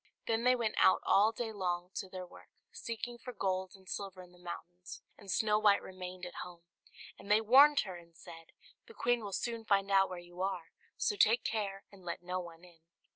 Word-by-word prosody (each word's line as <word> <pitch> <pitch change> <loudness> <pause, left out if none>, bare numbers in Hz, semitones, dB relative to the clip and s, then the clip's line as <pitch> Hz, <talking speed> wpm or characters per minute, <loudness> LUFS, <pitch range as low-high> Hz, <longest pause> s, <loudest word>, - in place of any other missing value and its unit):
Then 230 +1 0
they 250 0 +6
went 230 -3 -1
out 190 - +5
all 210 +3 +5
day 225 0 -4
long 180 -2 -2
to 190 - -4
their 185 -1 -6
work, - - -16 0.2
seeking 240 - -6
for 250 +1 -8
gold 185 -2 -2
and 190 -1 -19
silver 190 -2 -5
in 180 - -16
the 180 - -20
mountains; 175 +1 -9
and 200 - -14
Snow 210 +2 +2
White 205 -2 +5
remained 185 -1 -7
at 175 - -7
home: 175 -1 -10 0.6
and 200 - -12
they 210 +1 +6
warned 275 +6 +7
her, 185 -3 -6
and 170 -1 -17
said, 165 0 -12 0.4
"The 455 - -14
queen 240 -1 +1
will 200 - -5
soon 230 +3 -3
find 200 -2 +2
out 195 0 +5
where 185 - -6
you 175 +1 -9
are, 185 -4 -2 0.3
so - - +1
take 225 +3 +4
care 200 -3 -2
and 195 -2 -16
let 175 0 -5
no 180 +1 -2
one 170 -1 -10
in." 175 -2 -17
195 Hz, 215 wpm, -33 LUFS, 180-220 Hz, 0.6 s, warned